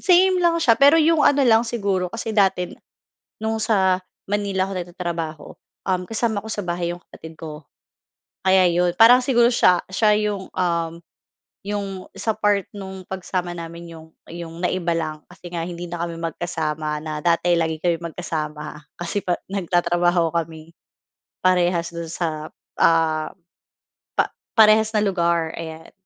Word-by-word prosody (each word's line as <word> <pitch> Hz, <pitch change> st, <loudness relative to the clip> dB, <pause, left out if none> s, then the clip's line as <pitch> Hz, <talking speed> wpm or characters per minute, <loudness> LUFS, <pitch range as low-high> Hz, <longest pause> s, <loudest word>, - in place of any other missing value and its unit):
Same 370 Hz, +1 st, +5 dB
lang 340 Hz, -1 st, +3 dB
siya, 285 Hz, -9 st, +4 dB
pero 285 Hz, +3 st, +7 dB
'yong 320 Hz, 0 st, +4 dB
ano 285 Hz, -1 st, +4 dB
lang 225 Hz, -2 st, +6 dB
siguro 200 Hz, -6 st, -1 dB
kasi 225 Hz, +3 st, -5 dB
dati 190 Hz, -4 st, +2 dB, 0.7 s
no'ng 220 Hz, 0 st, -1 dB
sa 195 Hz, -4 st, +2 dB, 0.3 s
Manila 200 Hz, -2 st, 0 dB
ako -, -, -6 dB
nagtatrabaho, 170 Hz, -3 st, -4 dB, 0.4 s
um, 185 Hz, -1 st, +1 dB
kasama 225 Hz, 0 st, -1 dB
ko -, -, -6 dB
sa 205 Hz, -, -3 dB
bahay 175 Hz, -1 st, -2 dB
yong 175 Hz, -, -11 dB
kapatid 160 Hz, 0 st, -11 dB
ko 155 Hz, -2 st, -9 dB, 0.8 s
kaya 190 Hz, -1 st, +5 dB
yon. 175 Hz, 0 st, +1 dB
Parang 245 Hz, +3 st, +8 dB
siguro 240 Hz, -2 st, +4 dB
siya 180 Hz, -7 st, +4 dB
siya 210 Hz, +2 st, +3 dB
yong, 205 Hz, -3 st, -2 dB
um, 170 Hz, -2 st, 0 dB, 0.7 s
yong 205 Hz, 0 st, -3 dB, 0.2 s
sa 220 Hz, -2 st, -2 dB
part 205 Hz, -1 st, +1 dB
no'ng 190 Hz, -2 st, -8 dB
pagsama 180 Hz, -2 st, -3 dB
namin 170 Hz, 0 st, -8 dB
yong 160 Hz, 0 st, -13 dB, 0.2 s
yong 170 Hz, 0 st, -8 dB
naiba 175 Hz, -1 st, 0 dB
lang. 155 Hz, -2 st, -2 dB, 0.2 s
Kasi 180 Hz, -1 st, -11 dB
nga 170 Hz, -1 st, -2 dB
hindi 175 Hz, 0 st, -6 dB
na 170 Hz, 0 st, -6 dB
kami 170 Hz, -1 st, -5 dB
magkasama 155 Hz, -2 st, -3 dB
na 155 Hz, -1 st, -5 dB
dati 170 Hz, 0 st, +3 dB
lagi 160 Hz, -1 st, -1 dB
kami 170 Hz, -2 st, +1 dB, 0.2 s
magkasama. 150 Hz, -3 st, -5 dB, 0.2 s
Kasi 175 Hz, +4 st, -3 dB
pa 175 Hz, -1 st, -1 dB
nagtatrabaho 175 Hz, -2 st, +1 dB
kami 165 Hz, -1 st, -4 dB, 0.7 s
parehas 175 Hz, -2 st, +2 dB
do'n 170 Hz, -1 st, -5 dB
sa, 160 Hz, -3 st, -3 dB, 0.3 s
ah, 160 Hz, -1 st, +3 dB, 0.9 s
pa -, -, +4 dB, 0.3 s
parehas 220 Hz, 0 st, +5 dB
na 210 Hz, -, +3 dB
lugar. 170 Hz, -4 st, +1 dB
Ayan. 160 Hz, 0 st, -8 dB
175 Hz, 150 wpm, -22 LUFS, 165-205 Hz, 0.9 s, Parang